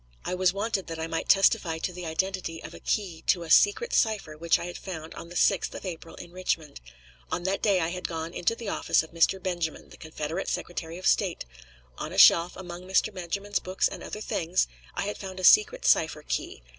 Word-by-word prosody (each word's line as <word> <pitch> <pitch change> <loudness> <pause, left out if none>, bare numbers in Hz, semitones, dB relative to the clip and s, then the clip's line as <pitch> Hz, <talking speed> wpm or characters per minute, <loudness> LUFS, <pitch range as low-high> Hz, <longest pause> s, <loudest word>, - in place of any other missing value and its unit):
I - - -2
was 180 0 +3
wanted 200 0 -2
that 165 -1 -5
I 160 - -3
might 165 0 -3
testify 185 -4 +4
to 180 +3 -3
the 180 -1 -6
identity 175 0 -2
of - - -9
a - - -10
key 180 -7 -2
to 175 - +3
a 160 - -6
secret 445 - +4
cipher 210 -9 +1
which 165 +2 +2
I - - -6
had 175 - -7
found 160 -4 -7
on 170 - -9
the 175 - -10
6th 190 0 +2
of - - -7
April 165 -2 -7
in 170 - -10
Richmond. 165 -5 -3 0.5
On 175 - -2
that 190 +2 -1
day 200 -4 +3
I 165 -1 0
had 180 +1 -4
gone 165 0 -5
into 200 +6 0
the 230 -2 -8
office 195 - +1
of 160 - -12
Mr. 170 +3 +2
Benjamin, 175 -4 -3
the - - -14
Confederate 160 +2 -5
Secretary 170 -1 -4
of 185 - -8
State; 190 -5 +1 0.5
on - - -5
a - - -6
shelf, 170 +1 +7
among 175 -1 -8
Mr. 190 +3 +2
Benjamin's 195 +3 -2
books 185 +1 0
and - - -8
other 210 - -7
things, 175 -3 0 0.3
I - - -1
had 205 +1 -4
found 190 -1 -7
a - - -6
secret 435 - +5
cipher 155 -1 +3
key. - - -3
180 Hz, 220 wpm, -27 LUFS, 165-195 Hz, 0.5 s, shelf